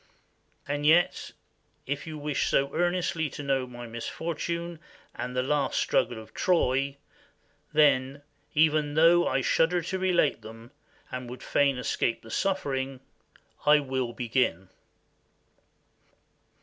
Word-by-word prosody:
And 145 +1 -2
yet, 165 +4 +3 0.5
if 145 +3 -4
you 155 -1 -6
wish 145 -1 -1
so 140 0 +1
earnestly 175 -3 0
to 145 - -7
know 135 -2 0
my 120 -1 -9
misfortunes 170 +8 -4 0.3
and 125 0 -5
the 125 - +1
last 145 +1 0
struggle 120 -2 +1
of 110 - -13
Troy, 140 -5 +1 0.7
then, 140 -2 +3 0.3
even 150 -1 +3
though 170 +2 +5
I 135 +1 +1
shudder 165 +6 +2
to 190 +3 -3
relate 180 -5 +2
them 115 +2 -12 0.4
and 125 -1 -5
would 125 +1 -9
fain 140 -2 +2
escape 120 -2 -1
the 115 - -11
suffering, 135 - -1 0.6
I 150 0 +6
will 130 -3 -2
begin." 115 -6 -1
140 Hz, 125 wpm, -27 LUFS, 125-160 Hz, 0.7 s, I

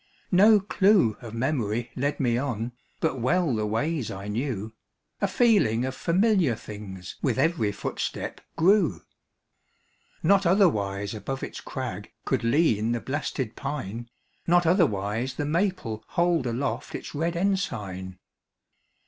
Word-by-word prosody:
No 205 +3 +7
clue 195 - +3
of 115 -2 -8
memory 120 -3 -1
led 140 +3 -1
me 120 -3 +2
on, 120 -3 -2 0.3
But 155 -5 0
well 160 +4 +2
the 110 -1 0
ways 140 +4 -1
I 100 +1 -6
knew; 110 -2 -3 0.5
A 200 - +3
feeling 190 - +3
of 130 - -3
familiar 180 - +2
things 100 -4 -9
With 130 -4 0
every 140 -7 +2
footstep 105 - -4
grew. 195 +5 +3 1.2
Not 200 -2 +4
otherwise 105 - +2
above 135 +5 -5
its - - -6
crag - - -5
Could - - 0
lean 115 -4 +2
the 120 - -1
blasted 130 -3 -3
pine; 120 -4 -5 0.4
Not 175 0 +4
otherwise 125 - +1
the 145 - -2
maple 160 - -1
hold 170 -6 +1
Aloft 120 +4 -2
its - - -7
red 165 +3 -1
ensign. 105 - -2
130 Hz, 130 wpm, -26 LUFS, 110-170 Hz, 1.2 s, No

